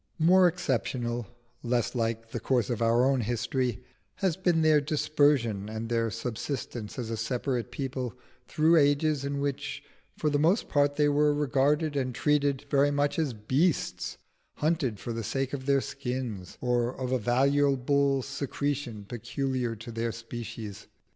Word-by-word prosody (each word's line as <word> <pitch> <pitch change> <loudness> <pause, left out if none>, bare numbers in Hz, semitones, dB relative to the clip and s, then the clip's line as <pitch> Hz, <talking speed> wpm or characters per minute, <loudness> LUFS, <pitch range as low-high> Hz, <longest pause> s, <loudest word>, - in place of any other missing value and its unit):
More 180 +3 +6
exceptional 120 - -1 0.3
less 120 -1 0
like 115 -1 -2
the 120 - -3
course 125 0 +1
of 120 - -2
our 115 +2 +4
own 135 -1 +2
history 120 +1 -1 0.3
has 190 -5 0
been 175 -3 +2
their 155 -1 +5
dispersion 145 - +1
and 110 +1 -5
their 115 -1 +1
subsistence 115 0 -5
as 115 -3 -4
a 115 - -2
separate 120 0 -2
people 130 -3 -4 0.3
through 160 +2 +4
ages 145 0 +3
in 140 0 -2
which 140 0 -3 0.3
for 150 - 0
the 145 - +2
most 170 +9 +3
part 145 0 +2
they 150 0 +3
were 145 0 +3
regarded 145 +2 +1
and 130 -3 -1
treated 145 -1 +1
very 140 0 +3
much 145 +2 0
as 150 -6 0
beasts 130 +10 0 0.4
hunted 150 - 0
for 120 - -4
the 115 0 -3
sake 135 +4 -2
of 135 -1 -5
their 140 -1 +4
skins, 125 -10 -5
or 120 0 +1
of 130 -1 -2
a 130 - +2
valuable 140 +2 +2
secretion 140 -5 -3
peculiar 120 +2 -2
to 115 +2 -9
their 115 0 -2
species. 115 -2 -7
130 Hz, 155 wpm, -28 LUFS, 120-145 Hz, 0.4 s, More